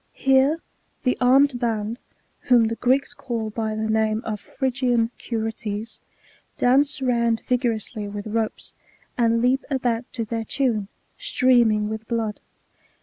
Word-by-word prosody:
Here 270 +4 +3 0.4
the 250 - +2
armed 260 +1 +4
band, 225 -1 -2 0.5
whom 235 -3 +5
the 230 - -2
Greeks 255 +4 +1
call 225 -3 -4
by 220 0 -2
the 220 0 -2
namie 220 +1 +1
of 215 -2 -4
Phrygian 245 0 0
Curetes, 225 -1 -4 0.6
dance 270 +2 +3
round 235 -2 +1
vigorously 230 -3 -1
with 205 0 -6
ropes, 220 0 -3 0.4
^ - - -43
and 230 -1 +2
leap 260 +2 +2
about 245 -3 -1
to 230 - -3
their 225 +1 -3
tune, 225 -6 0 0.3
streaming 235 -5 +3
with 220 +1 -5
blood. 225 -3 -2
230 Hz, 135 wpm, -23 LUFS, 220-250 Hz, 0.6 s, whom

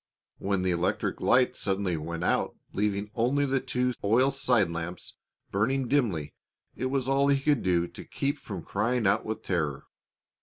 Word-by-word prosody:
When 100 -1 0
the 95 - +2
electric 85 +1 -1
lights 125 0 +3
suddenly 95 -2 0
went 85 +2 -4
out - - +1 0.2
leaving 105 +1 -1
only 130 +5 +2
the 135 -1 +1
two 125 0 -1
oil 120 +7 +4
side 125 -9 +2
lamps 85 +1 -5 0.4
burning 125 +6 +1
dimly, 105 - 0 0.4
it 130 - -2
was 130 -1 -1
all 135 +1 +3
he 140 -1 +3
could 145 -2 +2
do 85 -2 +2
to - - -10
keep 140 +1 -2
from 95 -6 -7
crying 115 +3 0
out 105 +3 +2
with 110 - -4
terror. 80 -7 -1
105 Hz, 165 wpm, -28 LUFS, 90-130 Hz, 0.4 s, oil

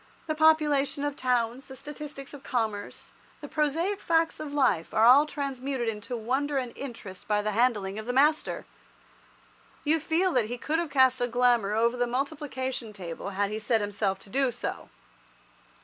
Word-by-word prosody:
The 310 - -1
population 305 -3 +3
of 290 -1 -1
towns, 250 0 0
the 265 - -10
statistics 295 -1 -8
of 285 - -9
commerce, 220 -6 -3 0.3
the 290 - -8
prosaic 325 +8 0
facts 330 -1 +1
of 305 -2 -5
life 260 - +1
are 220 - +5
all 275 +5 +7
transmuted 270 -4 -3
into 225 +2 -3
wonder 270 +6 -1
and 250 -3 -3
interest 225 -8 -8
by 210 -1 +1
the 215 - 0
handling 210 -3 +1
of 220 - -8
the - - 0
master. 295 +4 +2 1.2
You 315 +2 +2
feel 340 +4 +1
that 245 -4 +3
he 245 +3 -5
could 310 +6 -1
have 340 -2 -2
cast 260 -2 +4
a 245 - +2
glamour 240 -4 +2
over 235 +2 +2
the 245 0 +1
multiplication 260 -3 -3
table 180 -1 -6
had 200 +1 -1
he 215 - -3
set 225 +1 +1
himself 205 -1 -1
to 195 - -14
do 270 0 +2
so. 245 - -5
255 Hz, 175 wpm, -28 LUFS, 225-290 Hz, 1.2 s, all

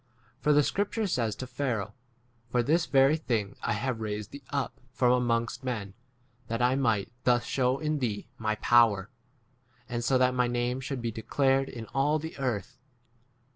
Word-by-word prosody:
For 150 - +2
the 150 0 +5
scripture 205 +6 -1
says 120 - 0
to 130 - -6
Pharaoh, 120 -6 -2 0.6
For 120 0 +2
this 165 +6 +2
very 135 +3 +5
thing 110 -10 -2
I 120 - 0
have 115 +2 -2
raised 105 -1 -4
thee 140 - -9
up 140 -2 -3
from 125 -1 +3
amongst" 120 -1 0
[men], 110 -7 -3 0.5
that 115 0 -2
I 125 +1 +3
might 115 -6 +1
thus 120 -1 +3
shew 130 0 +1
in 155 0 -1
thee 110 -6 -2
my 110 -1 0
power, 110 -4 +4 0.8
and 120 -1 -3
so 130 +2 +3
that 130 0 +3
my 125 -1 +2
name 120 +1 -1
should 130 -2 -4
be 115 - -1
declared 135 +4 +1
in 115 -3 -7
all 145 +3 +2
the 160 +1 -6
earth. 125 -1 -3
125 Hz, 175 wpm, -29 LUFS, 115-135 Hz, 0.8 s, the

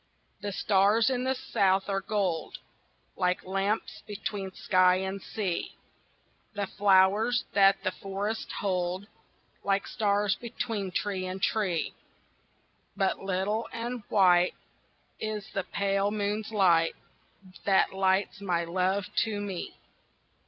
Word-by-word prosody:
The 205 -1 -3
stars 205 +5 +3
in 250 0 -1
the 265 0 +1
South 195 -5 +1
are 195 -1 0
gold 195 -6 -1 0.6
Like 180 0 0
lamps 195 +3 -1
between 200 -2 -4
sky 185 -1 +3
and 190 +1 -3
sea; 190 -6 -3 0.8
The 200 0 -1
flowers 205 +5 +3
that 195 0 +5
the 185 - +1
forests 200 +4 -4
hold 185 -1 -1 0.6
Like 195 0 +1
stars 205 -1 +1
between 225 -4 -4
tree 185 0 -2
and 185 +1 -5
tree; 190 -4 0 1.0
But 195 -1 +1
little 195 +4 -1
and 235 +1 -4
white 180 -3 +4 0.6
Is 215 -2 -4
the 195 -3 -2
pale 200 0 0
moon's 210 +1 -2
light 175 -6 +3 0.7
That 195 -1 +3
lights 190 +1 +1
my 175 -3 0
love 185 +3 0
to 215 -2 +1
me. 195 -3 -5
195 Hz, 115 wpm, -28 LUFS, 185-210 Hz, 1.0 s, that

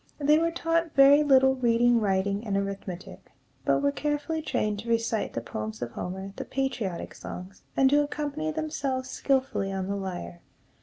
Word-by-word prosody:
They 300 +1 +4
were 335 +1 +2
taught 330 -1 -1
very 280 +1 +8
little 265 -2 +5
reading, 240 -1 +3
writing, 200 +1 0
and 200 -3 -1
arithmetic, 195 -2 -6 0.3
but 140 0 +2
were 140 - +3
carefully 295 - -2
trained 210 -8 -1
to 230 +3 -7
recite 230 -1 0
the 115 - -2
poems 110 -1 -5
of 120 - -5
Homer, 190 +8 -5
the - - -3
patriotic 240 -10 -3
songs, 185 +2 -9 0.2
and 270 - +5
to 290 +1 +5
accompany 300 +1 -3
themselves 280 -4 -3
skillfully 260 -8 0
on 190 -1 -2
the 200 +1 -2
lyre. 175 - -5
235 Hz, 165 wpm, -27 LUFS, 190-290 Hz, 0.3 s, very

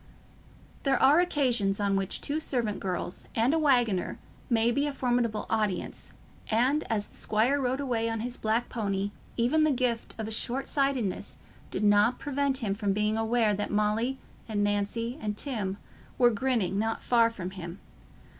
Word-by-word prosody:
There 270 -2 +2
are 290 +5 +6
occasions 245 - +1
on 200 -1 +1
which 195 -1 -1
two 295 +2 -1
servant 240 -9 -2
girls 180 -1 -3
and 230 +5 +3
a 325 - +2
waggoner 245 - +2 0.3
may 230 -1 +3
be 280 +4 +1
a 290 - -3
formidable 240 -4 0
audience, 210 -5 -2 0.4
and 255 +7 +2
as 210 -2 0
the - - -21
squire 240 +7 +1
rode 260 +1 0
away 235 -5 0
on 225 -1 -2
his 245 +1 -3
black 225 +1 0
pony, 200 -3 -2 0.3
even 260 +7 +3
the 310 - +4
gift 250 -4 -1
of 220 0 -3
short 260 +4 -1
sightedness 270 -9 -1 0.3
did - - -2
not 205 +3 +4
prevent 280 -2 -1
him 200 -3 0
from 200 -1 -1
being 210 +1 +1
aware 225 -1 +2
that 205 +1 -2
Molly 215 +5 +1 0.3
and 205 -1 0
Nancy 205 +5 -1
and 210 -1 -3
Tim 210 -9 -2 0.4
were 245 -1 +5
grinning 215 -5 0
not 225 +1 -1
far 230 -2 +4
from 185 -5 -6
him. 180 -1 -8
230 Hz, 165 wpm, -28 LUFS, 205-260 Hz, 0.4 s, are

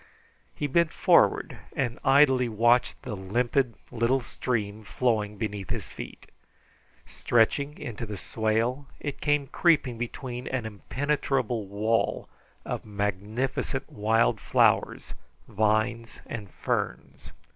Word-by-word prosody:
He - - -2
bent 155 +3 +2
forward - - +3 0.2
and 125 -2 -1
idly 135 -3 +5
watched 120 +3 +3
the 125 -6 -4
limpid 120 +6 0 0.2
little 120 +2 +2
stream 110 -4 -3
flowing 105 -2 0
beneath 105 -4 -4
his - - -4
feet. - - -9 0.8
Stretching 140 +5 +1
into 115 -1 -6
the 105 -1 -5
swale, 115 +7 -1
it 140 -1 -5
came 145 -1 +2
creeping 135 -6 +2
between 125 +1 -5
an 125 -4 -2
impenetrable 125 +1 -1
wall 110 +3 0 0.4
of - - -3
magnificent 105 +6 -2
wild 110 +2 +2
flowers, - - +2 0.3
vines, 110 +2 0
and 105 -5 -6
ferns. - - -3
115 Hz, 110 wpm, -27 LUFS, 105-130 Hz, 0.8 s, idly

